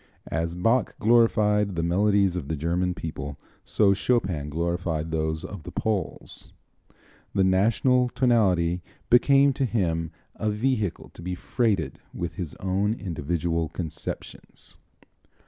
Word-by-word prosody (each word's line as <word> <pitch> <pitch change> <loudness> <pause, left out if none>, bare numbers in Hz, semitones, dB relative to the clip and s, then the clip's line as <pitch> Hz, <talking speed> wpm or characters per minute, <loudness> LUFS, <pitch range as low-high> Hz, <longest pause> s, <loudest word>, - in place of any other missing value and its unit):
As 85 +1 -1
Bach 115 +7 +1
glorified 105 -3 +3
the 85 - -1
melodies 100 +1 +2
of 85 -6 -4
the 80 - -2
German 85 +4 -1
people, 75 -4 -6 0.3
so 100 -2 +3
Chopin 95 - 0
glorified 85 0 -2
those 80 0 -1
of 95 -1 -7
the - - -9
Poles. 105 -4 -3 0.8
The 95 - +4
national 115 +7 +3
tonality 95 -9 +2 0.3
became 140 +3 +5
to 140 - -1
him 85 -8 0 0.3
a 110 - -1
vehicle 105 -4 -1
to - - -14
be 90 +1 -3
freighted 95 - -1 0.2
with 85 -1 -3
his 85 -3 -6
own 100 +3 0
individual 85 -3 -2
conceptions. 80 -4 -7
95 Hz, 125 wpm, -26 LUFS, 85-110 Hz, 0.8 s, became